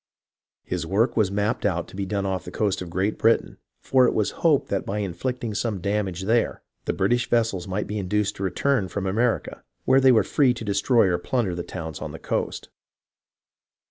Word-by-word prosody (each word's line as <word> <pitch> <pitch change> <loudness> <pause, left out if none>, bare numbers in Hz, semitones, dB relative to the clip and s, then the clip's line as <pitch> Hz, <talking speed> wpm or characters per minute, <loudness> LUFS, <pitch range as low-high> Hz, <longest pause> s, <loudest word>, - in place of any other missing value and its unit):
His 90 -2 -3
work 100 +8 +1
was 110 -4 +3
mapped 105 +3 -1
out 85 -4 0
to - - -12
be 100 0 -3
done 100 0 -1
off 95 -1 -2
the - - -8
coast 100 -3 -1
of 90 - -6
Great 95 +5 -1
Britain, 115 +1 +2 0.2
for 130 -2 +4
it - - 0
was 105 - +1
hoped 155 -5 +3
that 100 - -1
by 100 - -3
inflicting 110 +5 -3
some 105 -1 -2
damage 95 -1 -2
there 115 +3 +1 0.2
the - - +1
British 120 +5 +1
vessels 115 -6 +1
might 95 +2 -2
be 105 +1 -3
induced 100 +2 -1
to 100 - -4
return 115 +3 +1
from 95 +2 -4
America, 115 +5 -1 0.2
where 135 - +5
they 130 -1 +7
were 110 -4 +5
free 130 +4 +2
to 115 - -7
destroy 105 +4 +3
or 90 -1 +1
plunder 110 -1 -1
the 85 - -3
towns 80 -3 -6
on - - -5
the - - -6
coast. - - -3
100 Hz, 205 wpm, -24 LUFS, 95-115 Hz, 0.2 s, they